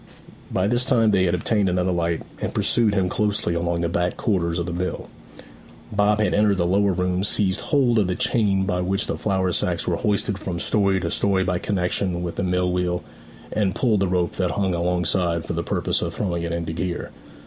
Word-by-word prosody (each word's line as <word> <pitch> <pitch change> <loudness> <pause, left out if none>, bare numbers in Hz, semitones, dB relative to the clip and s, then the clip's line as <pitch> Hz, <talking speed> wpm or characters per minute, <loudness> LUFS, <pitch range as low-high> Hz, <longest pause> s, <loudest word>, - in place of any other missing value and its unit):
By 95 - 0
this 120 +4 +2
time 115 -3 +3
they 95 -2 +3
had 90 - +1
obtained 100 +2 +1
another 90 +1 +1
light, 85 -1 -1 0.2
and - - -3
pursued 115 -4 +2
him 95 -2 +2
closely 105 -2 0
along 85 0 -1
the 85 - +1
back 90 +1 -1
quarters 85 -5 0
of 85 - -1
the 85 - -4
mill. 90 +1 -4 0.8
Bob 105 0 +2
had 105 -4 +1
entered 105 -1 +3
the 85 - +1
lower 100 +3 +2
room, 90 0 0
seized 100 -2 +1
hold 125 -6 +2
of 100 - +2
the 90 - -1
chain 105 -6 +1
by 90 -2 -1
which 95 +3 -1
the - - -2
flour 95 -3 0
sacks - - 0
were - - +1
hoisted 100 -1 0
from 90 -2 -4
story 100 +1 +2
to 85 -1 -2
story 95 -2 +2
by 90 -1 -1
connexion 90 -2 -1
with 85 -1 -4
the - - -1
mill 90 0 +1
wheel, 90 -1 -1 0.5
and 100 -4 0
pulled 115 -5 +2
the 100 - +1
rope 90 -2 -1
that 90 -2 +1
hung 95 +2 0
alongside 85 -1 0
for - - -3
the 85 - -1
purpose - - -1
of - - -3
throwing 85 -4 -2
it 85 0 -3
into 85 -1 -3
gear. 85 +1 -3
90 Hz, 215 wpm, -23 LUFS, 85-100 Hz, 0.8 s, time